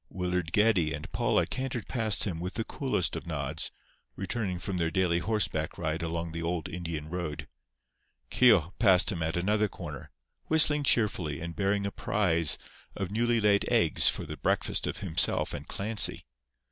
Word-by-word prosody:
Willard 90 -2 -2
Geddie 95 -7 +3
and 75 - -9
Paula - - +1
cantered 130 -4 -4
past 110 -4 +2
him 90 -6 -2
with 90 +2 -5
the 115 - -1
coolest 130 - -1
of - - -6
nods, 70 -5 -2 0.5
returning 95 -1 -3
from 95 +1 -4
their 85 -2 0
daily 85 -1 +1
horseback 105 +2 -1
ride 80 +2 -2
along 85 0 -3
the 85 +1 -5
old 85 -1 -2
Indian 80 -3 -5
road. 85 -3 -5 0.8
Keogh 100 -9 +4
passed 95 -3 +5
him 90 -4 -4
at 80 +1 -1
another 105 +4 +1
corner, 80 -7 -9 0.4
whistling 150 -2 +3
cheerfully 95 - +1
and 85 0 -6
bearing 100 0 0
a 100 - -2
prize 85 -9 +2 0.4
of 95 -1 -4
newly 120 +2 +1
laid 105 -1 +3
eggs - - +4
for - - -3
the 75 - -7
breakfast 65 - 0
of - - -3
himself - - +1
and 75 0 -7
Clancy. 105 +1 0
90 Hz, 165 wpm, -29 LUFS, 85-105 Hz, 0.8 s, passed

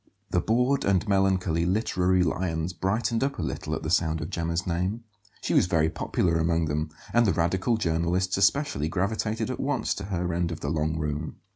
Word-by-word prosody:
The 90 - +2
bored 125 +7 +2
and 100 +1 +1
melancholy 95 -4 +2
literary 90 -1 +2
lions 80 0 -1
brightened 110 +5 0
up 140 +1 -1
a - - -2
little - - -3
at - - -6
the 80 - -2
sound 80 -3 +2
of 75 +1 -5
Gemma's 85 +1 -2
name; 90 +6 -2 0.4
she - - -1
was - - +4
very 80 -3 +2
popular 85 0 0
among 80 0 +1
them; 75 +1 -2 0.2
and 120 -1 +4
the 95 - +3
radical 95 +7 +1
journalists, 85 0 0
especially, 100 - +2
gravitated 110 +5 -1
at - - -5
once 135 -1 0
to 100 - -6
her 90 -3 -2
end 85 0 0
of 85 - -6
the 70 - -2
long 80 0 0
room. 75 0 -3
90 Hz, 190 wpm, -26 LUFS, 80-105 Hz, 0.4 s, was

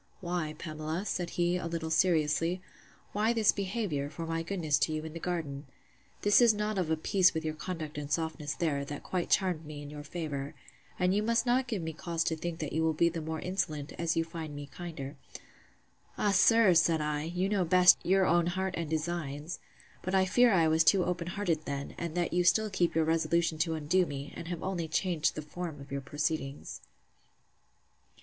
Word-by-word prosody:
Why, 175 -4 -3
Pamela, 155 +3 -4
said 180 -4 -2
he, 175 0 +2
a 175 - -4
little 165 -1 -3
seriously, 165 +1 +2 0.5
why 215 +3 +1
this 220 -3 +4
behaviour, 190 -8 -2
for 160 +3 -6
my 165 0 -2
goodness 165 -5 0
to 140 - +1
you 155 0 -3
in 160 - -7
the 165 - -6
garden?—This 165 - -1
is 235 -3 +6
not 210 -1 -1
of 175 -4 -1
a 160 - +1
piece 185 +2 +3
with 160 0 -2
your 155 - -1
conduct 155 -2 -5
and 145 0 -7
softness 160 -2 -2
there, 145 -5 0
that 145 +1 -7
quite 180 -2 -2
charmed 180 -5 +2
me 150 -1 -8
in 145 - -9
your 150 0 -7
favour: 145 -3 -5 0.4
And 180 0 +2
you 205 - +2
must 230 +2 +1
not 255 +1 +2
give 215 -8 -2
me 160 0 -4
cause 165 +1 -2
to 165 - 0
think 170 +1 -4
that 155 - -4
you 160 - +1
will 160 -1 +1
be 170 +2 +4
the 165 -1 -4
more 160 0 -4
insolent, 155 -6 -2
as 170 -1 0
you 165 - +3
find 160 -2 -7
me 145 0 -6
kinder. 145 -2 -7 1.0
Ah! 205 - +2
sir, 220 0 +6
said 165 -1 +4
I, 150 -1 -1
you 180 +3 -1
know 200 -2 +1
best 180 +1 +6
your 190 +1 +3
own 170 -1 +3
heart 190 +1 -1
and 165 -3 -3
designs! 155 -1 -3 0.4
But 185 +1 -2
I 190 0 +4
fear 240 +6 +4
I 170 -5 +4
was 160 +1 +4
too 185 +2 +4
open 175 -1 -2
hearted 175 -5 -1
then; 140 0 -4
and 170 -1 -4
that 175 -1 0
you 180 0 +3
still 215 +4 +3
keep 175 -4 +1
your 160 -1 +3
resolution 165 0 +1
to 160 0 +1
undo 165 +4 +2
me, 140 0 -6
and 165 - -7
have 175 -1 -4
only 180 -3 -2
changed 170 -2 0
the 155 - -5
form 160 0 -6
of 140 -1 -12
your 140 0 -2
proceedings. 145 0 -3
165 Hz, 205 wpm, -30 LUFS, 155-185 Hz, 1.0 s, is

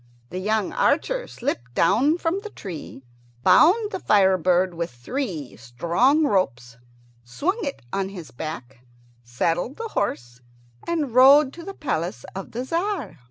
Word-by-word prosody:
The 180 - -4
young 215 +1 0
archer - - +1
slipped 125 - -4
down 275 - +3
from 345 +2 -1
the 430 - -8
tree, 165 - -9 0.4
bound 370 - +5
the 380 - -4
fire 190 - +4
bird 180 +1 +2
with 170 0 -3
three 155 - -5
strong 170 - +1
ropes, 125 - 0 0.5
swung 310 - -2
it 280 - -5
on 195 -1 -1
his 180 -5 -9
back, 135 -2 -7 0.4
saddled 165 - -1
the 455 0 -5
horse, 120 - -3 0.5
and 310 -8 -1
rode 270 +2 +7
to 340 - -10
the 390 +3 -8
palace 170 - -3
of 195 0 -7
the 240 +2 -4
Tzar. 340 - -2
195 Hz, 145 wpm, -23 LUFS, -, 0.5 s, rode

